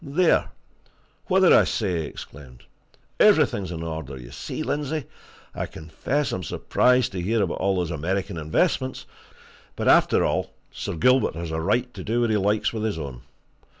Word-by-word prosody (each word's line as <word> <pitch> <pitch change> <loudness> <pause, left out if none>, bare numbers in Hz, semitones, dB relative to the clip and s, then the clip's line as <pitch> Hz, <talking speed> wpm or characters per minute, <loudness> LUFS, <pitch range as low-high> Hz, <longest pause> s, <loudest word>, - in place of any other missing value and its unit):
"There! 165 +5 +2 0.8
what 190 -1 +3
did 185 - +7
I - - +7
say?" 95 -6 -1
he 75 - -4
exclaimed. 65 -4 -11 0.6
"Everything 100 - +4
is 90 - -7
in 80 -1 -5
order, 80 -5 -5
you - - -11
see, - - -5
Lindsey! 150 -1 -2 0.5
I - - -3
confess 85 - -3
I'm 95 - -3
surprised 125 +7 +2
to 95 -2 -4
hear 110 +4 +1
about 90 - -3
those 90 -3 0
American 90 +4 -2
investments; 80 +11 0 0.7
but, - - -3
after - - +5
all, - - -2 0.2
Sir - - -5
Gilbert 125 - +3
has 85 -1 -5
a 80 0 -2
right 125 +9 0
to - - -8
do 115 +3 0
what 120 -2 +1
he 110 - +3
likes 105 +3 +1
with 110 - -3
his 110 -4 -1
own. 70 -6 -6
95 Hz, 175 wpm, -24 LUFS, 80-125 Hz, 0.8 s, did